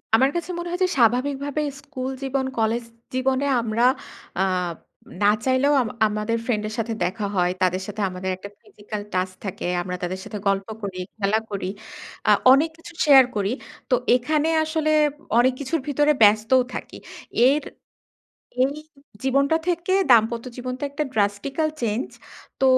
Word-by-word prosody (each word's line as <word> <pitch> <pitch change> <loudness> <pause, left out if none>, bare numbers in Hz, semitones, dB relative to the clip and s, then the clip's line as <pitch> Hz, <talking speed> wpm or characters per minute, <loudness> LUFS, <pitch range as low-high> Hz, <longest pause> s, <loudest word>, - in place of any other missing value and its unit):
আমার 265 +4 +4
কাছে 345 +1 -2
মনে 345 0 -4
হয় 355 - -3
যে 365 - +2
স্বাভাবিকভাবে 275 +5 +1 0.2
স্কুল 265 -3 -5
জীবন, 270 0 -1
কলেজ 225 +1 +1 0.3
জীবনে 260 +1 +1 0.2
আমরা 225 +1 0 0.6
আব 180 -3 0 0.5
না 205 - +5 0.2
চাইলেও 260 +2 +3
আম 235 - -2 0.2
আমাদের 210 +2 -1
ফ্রেন্ডের 215 -3 -1
সাথে 230 0 -1
দেখা 200 +4 -2
হয়। 180 -1 +2
তাদের 185 0 +2
সাথে 210 +1 -5
আমাদের 185 +1 -4
একটা 200 +2 -9
ফিজিক্যাল 210 0 -8
টাচ 185 0 0
থাকে। 195 -3 -5 0.2
আমরা 180 0 -4
তাদের 185 +1 -3
সাথে 210 - -6
গল্প 195 0 +1
করি, 195 -3 -5 0.2
খেলা 210 +1 +2
করি, 200 -2 -3 0.6
আ - - +8 0.2
অনেক 290 +5 +5
কিছু 345 +1 -12
শেয়ার 270 -3 +8
করি। 200 0 0 0.4
তো 255 - +5 0.2
এখানে 300 +5 +1
আসলে 315 0 0 0.5
অনেক 255 +2 +4
কিছুর 290 +4 -1
ভিতরে 295 +1 +3
ব্যস্তও 215 +5 +5
থাকি। - - -7 0.5
এর 290 +3 +3 1.0
এই 260 +2 +4 0.5
জীবনটা 275 +4 +3
থেকে 350 +1 0 0.2
দাম্পত্য 230 0 +4
জীবনটা 255 +1 -5
একটা 285 +2 -2
drastical 215 +9 0
চেঞ্জ। 225 +2 -1 0.5
তো - - +1
240 Hz, 150 wpm, -23 LUFS, 205-280 Hz, 1.0 s, আ